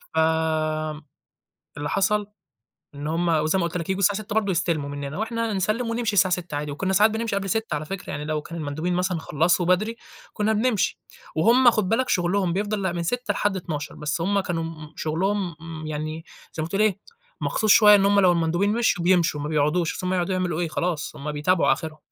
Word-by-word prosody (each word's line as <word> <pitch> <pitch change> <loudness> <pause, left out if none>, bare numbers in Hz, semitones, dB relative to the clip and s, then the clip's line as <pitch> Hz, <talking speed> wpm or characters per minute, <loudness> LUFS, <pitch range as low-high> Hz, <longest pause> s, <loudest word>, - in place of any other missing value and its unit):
فآمم، 155 -1 0 0.8
اللي 145 0 -3
حصل 205 +1 +1 0.7
إن 145 +1 -6
هُم 170 +2 0
وزي 155 +3 +2
ما 170 - +1
قلت 170 +1 -3
لك 165 0 -4
ييجوا 190 +1 -1
الساعة 200 +2 +3
18:00 205 - -6
برضو 210 -3 +1
يستلموا 165 -5 0
مننا 145 +3 -5
وإحنا 230 0 -2
نسلِّم 215 +5 -1
ونمشي 230 -2 -1
الساعة 185 -2 +3
18:00 175 -4 -7
عادي، 150 0 -3
وكنا 190 +6 -2
ساعات 210 +3 +5
بنمشي 220 -2 -2
قبل 195 -1 -2
18:00 220 -6 -1
على 150 +1 -3
فكرة 195 +4 -6
يعني 145 +1 -4
لو 155 -1 -2
كان 170 0 -8
المندوبين 155 +4 -2
مثلًا 180 -1 0
خلَّصوا 170 +3 +1
بدري، 215 +6 +1 0.4
كنا 215 +1 0
بنمشي، 220 -1 0 0.4
وهُم 240 +8 +6
خُد 215 -5 0
بالك 255 +4 +1
شغلهم 180 0 +1
بيفضل 205 +1 -1
لأ، 185 -2 0
من 170 -1 -3
18:00 245 +4 -1
لحد 205 -2 0
00:00 150 -5 -5
بس 150 +2 -3
هُم 200 +3 +1
كانوا 170 -3 -2
م 155 -2 -8
شغلهم 180 +3 -1
م 160 -1 -7
يعني 155 +1 -4 0.3
زي 155 - -3
ما 160 - -3
تقول 200 +4 +1
إيه، 205 -2 +1 0.4
مخصوص 215 -2 0
شوية 210 -1 +8
إن 195 -1 +4
هُم 200 0 +4
لو 180 -2 +5
المندوبين 175 +5 +1
مشيوا، 225 -7 +1
بيمشوا 175 -5 +3
ما 150 - -3
بيقعدوش، 155 +3 +1
أصل 185 - -4
هُم 185 - 0
هيقعدوا 185 +1 0
يعملوا 180 -3 -1
إيه، 170 - -1
خلاص 155 -2 -3
هُم 150 +1 -5
بيتابعوا 165 +5 +2
آخرهم. 155 -2 -4
180 Hz, 210 wpm, -24 LUFS, 155-205 Hz, 0.8 s, شوية